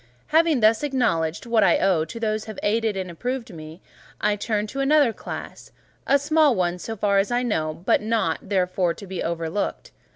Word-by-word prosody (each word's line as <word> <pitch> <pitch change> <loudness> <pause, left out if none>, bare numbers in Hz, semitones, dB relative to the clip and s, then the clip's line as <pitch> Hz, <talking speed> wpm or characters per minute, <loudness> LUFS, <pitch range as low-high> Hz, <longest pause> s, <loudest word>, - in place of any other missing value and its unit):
Having 315 -4 +3
thus 220 +1 +4
acknowledged 230 - 0
what 230 -2 +3
I 175 - +4
owe 185 -5 +2
those 215 +4 -3
who - - -11
have 215 - -7
aided 220 -1 0
and 185 -2 -4
approved 245 +5 -4
me, 155 +1 -10 0.4
I 210 0 +1
turn 210 0 -1
to 270 +6 -6
another 275 -3 +3
class; - - -8 0.4
a 280 - +5
small 300 -1 +3
one, 180 -1 -1
so 225 +5 -5
far 200 -1 +2
as 195 - 0
I 245 +1 0
know, 160 -8 -2
but - - +3
not, 215 -7 0
therefore, 180 -3 +1
to 200 - -10
be 190 -2 -5
overlooked. 165 +3 -3
210 Hz, 190 wpm, -23 LUFS, 180-240 Hz, 0.4 s, a